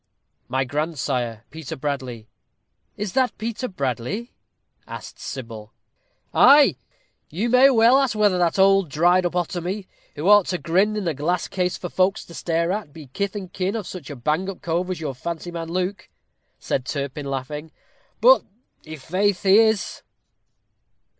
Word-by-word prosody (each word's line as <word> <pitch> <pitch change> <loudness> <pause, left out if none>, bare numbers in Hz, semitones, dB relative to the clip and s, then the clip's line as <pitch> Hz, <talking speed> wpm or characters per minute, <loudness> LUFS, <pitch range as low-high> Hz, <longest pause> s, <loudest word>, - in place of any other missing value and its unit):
"My 130 +2 0
grandsire, 130 -6 -2
Peter 160 -1 -7
Bradley." 130 -5 -4 0.7
"Is 205 -2 -4
that 260 -2 +1
Peter 230 +3 -3
Bradley?" 140 - -3 0.5
asked - - -9
Sybil. 115 -5 -8 0.6
"Ay, - - +7 0.5
you 200 +10 -2
may 255 +2 +7
well 240 +1 +5
ask 270 -5 0
whether 205 -4 +3
that 175 0 +1
old 195 -2 +4
dried 175 +5 +3
up 175 - -8
otomy, 180 +3 -2 0.3
who 155 +4 -3
ought 205 -2 +6
to 180 - -1
grin 190 +6 +1
in 205 -4 -2
a 165 - +1
glass 155 +6 -1
case 180 -1 -1
for 180 - -5
folks 185 +2 +1
to 170 - -13
stare 170 +1 -1
at, 200 -6 -4
be 150 -4 -12
kith 200 0 -2
and 185 -3 -7
kin 190 +2 -1
of 215 -4 -3
such 175 -8 -8
a 145 - -6
bang 155 +9 -1
up 195 - -8
cove 175 +2 -1
as 185 - -3
your 150 -4 -3
fancy 170 +6 -5
man, 165 -1 -5
Luke," 185 +3 -3 0.5
said 130 - -2
Turpin, 140 +1 -4
laughing 150 +3 -5 0.5
"but - - +7 0.5
i' 155 - -5
faith 185 +6 -1
he 195 +2 +6
is." 220 -5 +1
175 Hz, 160 wpm, -23 LUFS, 145-200 Hz, 0.7 s, Ay